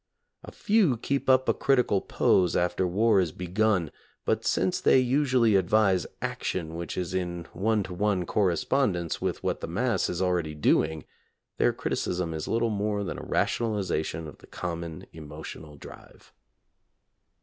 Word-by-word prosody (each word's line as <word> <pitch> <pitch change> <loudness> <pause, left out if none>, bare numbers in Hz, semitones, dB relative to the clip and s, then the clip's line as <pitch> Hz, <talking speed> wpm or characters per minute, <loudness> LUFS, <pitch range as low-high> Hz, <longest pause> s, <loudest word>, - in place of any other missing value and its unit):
A - - -10
few 200 - +2
keep 135 +4 -2
up 130 0 +4
a - - +4
critical 125 -8 +2
pose 90 -3 +2
after 90 +1 +1
war 105 +3 +3
is 90 -4 0
begun, 90 -1 0 0.3
but - - 0
since 95 -1 0
they - - +5
usually 130 -4 +3
advise 95 0 +3 0.2
action 80 -3 -3
which 85 -1 -5
is 90 0 -3
in 90 -2 -3
one 105 +3 +1
to 95 - -7
one 95 -1 0
correspondence 90 - 0
with - - -2
what - - -1
the - - -4
mass 105 +3 0
is 90 - -3
already 90 -4 0
doing, 80 +1 +1 0.5
their - - +3
criticism 90 -2 -2
is 80 -1 -4
little 115 0 +1
more 105 0 -1
than 95 - -5
a - - -8
rationalization 95 -8 -1
of 75 - -12
the - - -17
common 85 -2 -5
emotional 75 0 -9
drive. 70 - -14
95 Hz, 150 wpm, -27 LUFS, 85-110 Hz, 0.5 s, they